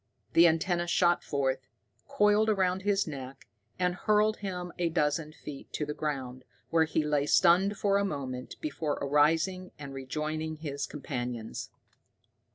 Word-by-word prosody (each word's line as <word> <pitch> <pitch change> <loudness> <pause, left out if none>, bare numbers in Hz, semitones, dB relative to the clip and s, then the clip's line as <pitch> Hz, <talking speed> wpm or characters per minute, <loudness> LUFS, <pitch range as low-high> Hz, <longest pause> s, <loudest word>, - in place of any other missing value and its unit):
The 170 +1 +8
antenna 175 +2 +1
shot 175 0 +3
forth, 135 -2 -1 0.4
coiled 215 -5 +3
around 190 -3 +1
his 200 0 +1
neck, 135 -3 -8 0.3
and 180 -1 +1
hurled 215 +3 +2
him 180 -3 -5
a 175 -1 +2
dozen 150 0 0
feet 150 -2 -10
to 150 - -1
the 150 - -3
ground, 130 -5 -4 0.3
where 165 -1 +4
he 160 0 0
lay 150 -1 +1
stunned 190 +5 +4
for 200 -1 +2
a - - +1
moment 130 -8 -4
before 150 0 -2
arising 165 +6 +2
and 140 -2 -8
rejoining 155 +4 -3
his 145 -2 -4
companions. 120 -5 -5
155 Hz, 145 wpm, -30 LUFS, 140-185 Hz, 0.4 s, The